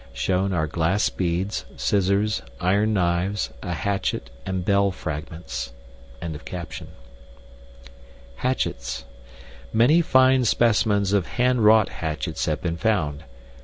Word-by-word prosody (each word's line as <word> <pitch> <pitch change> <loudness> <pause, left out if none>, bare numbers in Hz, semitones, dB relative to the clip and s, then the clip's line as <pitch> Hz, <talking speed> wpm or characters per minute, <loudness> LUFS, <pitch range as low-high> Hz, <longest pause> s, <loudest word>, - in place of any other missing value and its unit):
SHOWN 95 +8 0
ARE 80 -4 +1
GLASS 85 +6 +1
BEADS, 90 +3 -2
SCISSORS, 100 +2 +1 0.2
IRON 100 +4 +2
KNIVES, 90 -2 0
A 90 - -3
HATCHET, 95 -6 -2 0.2
AND 95 -1 -2
BELL 100 0 +3
FRAGMENTS.] 75 -6 -5 2.6
Hatchets. 60 - -2 0.7
Many 125 +10 +5
fine 130 -4 +4
specimens 105 -3 +2
of 100 -5 +2
handwrought 110 -4 +4
hatchets 75 -5 -3
have - - -1
been 85 -1 -1
found. 80 -8 0
95 Hz, 95 wpm, -24 LUFS, 85-110 Hz, 2.6 s, Many